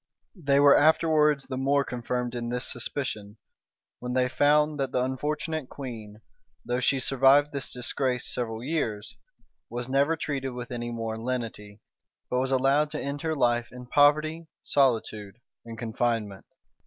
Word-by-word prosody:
[*] - - -53
They 140 -6 +2
were 145 0 +7
afterwards 150 -2 +3
the 130 -1 -5
more 140 +1 +2
confirmed 125 -1 -3
in 120 -1 -4
this 125 +1 -2
suspicion, 115 -4 -4 0.6
when 125 0 -4
they 130 0 +2
found 150 +2 +3
that 135 -2 -1
the 125 - +1
unfortunate 150 +2 -3
queen, 110 -6 -8 0.4
though 125 +1 -1
she 135 +1 +2
survived 135 +3 +4
this 140 -2 -4
disgrace 125 0 -2
several 115 -2 -4
years, 115 -9 -3 0.5
was 120 0 -5
never 140 +4 +2
treated 135 -4 -3
with 125 0 -7
any 120 -1 -4
more 115 -1 -4
lenity, 115 -4 -5 0.5
but 125 - +1
was 130 +1 0
allowed 135 +3 +2
to - - -4
end 140 +1 -4
her 160 -1 -1
life 120 -3 +1
in 125 0 -10
poverty, 155 +5 +3 0.2
solitude, 110 -7 +1 0.3
and 115 -1 -8
confinement. 115 -3 -2
130 Hz, 155 wpm, -27 LUFS, 120-145 Hz, 0.6 s, were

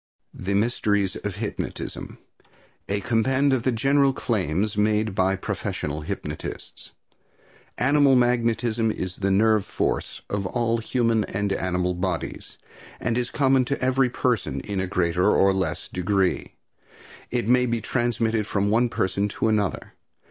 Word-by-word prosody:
THE 100 +2 -3
MYSTERIES 105 -3 +1
OF 105 -3 -5
HYPNOTISM. 105 0 -5 0.7
A 100 +1 0
Compend 130 +5 +2
of 130 - +1
the 130 - +1
General 135 +4 +3
Claims 105 - -1
Made 105 0 +1
by 95 +1 +2
Professional 75 -4 -4
Hypnotists. 75 - -6 0.8
Animal 140 +1 +4
magnetism 120 -2 +2
is 95 -4 -3
the 100 -1 0
nerve 105 +1 +3
force - - -2
of 100 -2 -2
all 115 +1 0
human 115 -1 +1
and 100 0 -2
animal 90 -1 -1
bodies, 90 -1 -4 0.4
and 115 0 -1
is 120 0 0
common 135 -2 +3
to 140 +3 -2
every 130 0 +2
person 120 -4 -1
in 100 -2 -3
a 95 - -2
greater 90 -1 +1
or 95 0 +4
less 95 -1 -2
degree. 95 +1 -1 0.7
It 120 -3 -1
may 125 +1 +4
be 120 0 0
transmitted 115 -2 0
from 100 0 0
one 120 +2 +3
person 100 -1 0
to 110 - -1
another. 105 -6 -1
110 Hz, 140 wpm, -24 LUFS, 95-120 Hz, 0.8 s, Animal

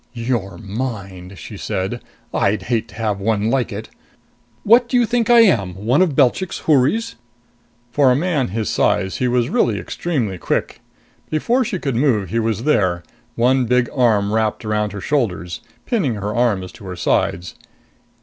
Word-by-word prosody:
"Your 115 -5 -2
mind!" 100 -4 -6
she - - -9
said. 95 +6 -3 0.3
"I'd 100 +2 +1
hate 115 -2 -1
to - - -15
have 110 -3 -2
one 110 +1 0
like 130 -2 0
it. 105 +2 -6 0.7
What 235 +3 +5
do 250 - +2
you 240 - +4
think 235 0 0
I 240 -1 +8
am? 100 - +3
One 115 - +1
of 170 -7 +2
Belchik's 145 +7 +1
houris?" 160 - +1 0.7
For 140 +1 +4
a - - +3
man 150 -3 0
his 110 +2 -3
size, 95 +1 +1
he 125 - 0
was 120 -1 +1
really 110 -4 +2
extremely 115 - -3
quick. - - -2 0.5
Before 235 - +1
she 225 -4 -3
could 135 -7 -3
move, 115 - +1
he 115 - +1
was 115 -1 -1
there, 90 - +1 0.3
one 125 +2 +2
big 125 0 +1
arm 110 -6 +2
wrapped 110 0 0
about 105 -1 -1
her 100 0 -7
shoulders, 90 - -2 0.2
pinning 190 - 0
her 105 +1 -3
arms 105 -6 0
to 100 - -14
her 90 -1 -6
sides. 90 0 0
115 Hz, 170 wpm, -19 LUFS, 100-140 Hz, 0.7 s, I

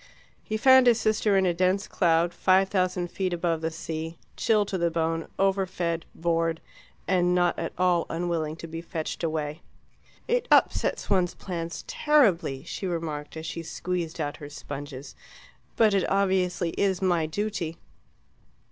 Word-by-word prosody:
He 215 - -2
found 260 +2 +6
his 235 -1 +5
sister 215 -2 +2
in 190 - +3
a 175 - +2
dense 185 +3 +1
cloud 170 -1 +2
five 190 +1 +3
thousand 185 -2 0
feet 185 -2 -2
above 170 -2 -1
the 160 - -1
sea, 160 0 -5 0.2
chilled 210 -3 +2
to 190 - -2
the 170 0 +2
bone, 165 0 -1
overfed, 185 -4 0
bored, 165 -1 0 0.5
and 180 -1 +2
not 175 -1 +2
at - - -3
all 180 -2 +2
unwilling 165 -2 -2
to 165 - -9
be 165 +1 -6
fetched 165 0 -5
away. 155 -1 -2 0.7
"It - - +1
upsets - - +3
one's 185 -3 +2
plans 170 -3 -5
terribly," 190 - +2
she 190 +3 -5
remarked, 160 -3 -4
as 160 - -6
she 165 +1 -4
squeezed 170 0 -4
out 145 -2 -3
her 145 -3 -9
sponges, 145 -1 -8 0.6
"but 220 -3 +4 0.2
obviously 185 -3 +1
it - - -8
is 190 -2 +2
my 175 -4 +1
duty." 175 -2 -3
175 Hz, 155 wpm, -26 LUFS, 165-190 Hz, 0.7 s, found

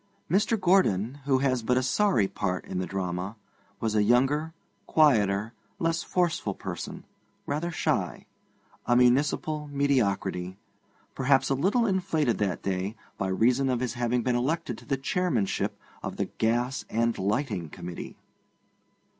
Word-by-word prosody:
Mr. 210 +4 +2
Gordon, 145 - +2
who 135 -2 +3
has 130 -2 +1
but 125 +3 +1
a 130 - +2
sorry 130 - +2
part 90 -2 -3
in 90 - -4
the 90 - -2
drama, 95 +1 -3 0.4
was 110 0 -1
a 105 - +3
younger, 135 +8 +2 0.4
quieter, 110 -8 +3 0.2
less 165 0 0
forceful 175 -2 0
person, - - -6 0.4
rather 155 +4 -2
shy; 160 - -1 0.6
a 120 - +4
municipal 145 +4 +2
mediocrity, 100 -10 0 0.6
perhaps 135 0 +2
a - - +5
little 200 - +2
inflated 175 - +1
that 100 -4 -1
day 95 +2 -2 0.2
by 95 - 0
reason 125 +8 +2
of 125 -2 +1
his 125 -2 -2
having 120 -1 0
been 125 0 +1
elected 155 +7 -1
to - - -16
the 135 -2 0
Chairmanship 135 - 0 0.2
of - - -5
the - - 0
Gas 120 +4 -1
and 115 +1 +1
Lighting 100 - -1
Committee. 85 +2 -8
125 Hz, 140 wpm, -27 LUFS, 105-150 Hz, 0.6 s, a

